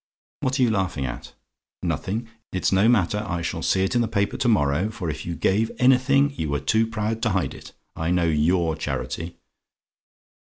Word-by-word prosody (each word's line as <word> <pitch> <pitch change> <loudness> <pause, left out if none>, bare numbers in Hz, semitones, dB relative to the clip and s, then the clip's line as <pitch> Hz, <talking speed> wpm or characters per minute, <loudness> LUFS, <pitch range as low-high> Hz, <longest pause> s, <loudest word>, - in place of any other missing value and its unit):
What 130 +1 -1
are - - +5
you 120 - +3
laughing 95 -9 -1
at? - - -7 0.5
"NOTHING? 110 +5 -2 0.2
"It's 95 - 0
no 100 +4 +4
matter: 105 -2 +2
I 85 -4 -3
shall - - -3
see 95 - +2
it 95 - 0
in 120 - +3
the 115 - +1
paper 100 -1 0
to - - 0
morrow; 90 -3 +2
for 90 -7 -4
if 80 +2 -7
you 85 - -3
gave 100 +7 +1
anything, 135 +2 +4
you 80 - -3
were 70 0 0
too 110 +11 +2
proud 110 0 -2
to 115 - +2
hide 90 -9 0
it. - - -12 0.2
I 80 +1 -2
know 90 -1 +2
YOUR 80 +1 +2
charity. 85 +1 -4
95 Hz, 195 wpm, -24 LUFS, 85-115 Hz, 0.5 s, are